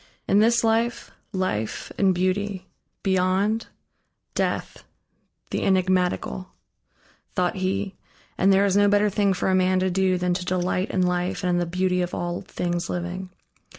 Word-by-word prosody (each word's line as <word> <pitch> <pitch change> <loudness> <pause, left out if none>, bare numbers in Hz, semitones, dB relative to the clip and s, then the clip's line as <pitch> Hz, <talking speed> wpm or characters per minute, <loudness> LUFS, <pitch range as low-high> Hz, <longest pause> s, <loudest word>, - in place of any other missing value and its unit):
"In 200 - +4
this 230 +2 +4
life, 230 +1 0 0.2
life 150 - -2
and 195 -2 +3
beauty; 185 +1 -1 0.4
beyond, 190 +4 +1 0.7
Death, - - -2 0.7
the - - -1
enigmatical" 185 -1 +1 0.9
thought 180 0 0
he, 195 +1 -1 0.4
and 195 - +3
there 195 +1 +5
is 195 -1 +1
no 205 0 +5
better 205 0 +3
thing 200 0 +2
for 190 0 0
a - - +2
man 185 0 +3
to 185 0 +1
do 185 0 +2
than 180 0 0
to 180 +1 -2
delight 180 +1 -1
in 185 - +1
life 180 +2 -1
and 180 - +1
in 175 - +2
the 175 - -1
beauty 180 +1 0
of 175 0 -2
all 175 0 -3
things 175 0 -3
living. 180 +1 -4
185 Hz, 155 wpm, -24 LUFS, 180-195 Hz, 0.9 s, there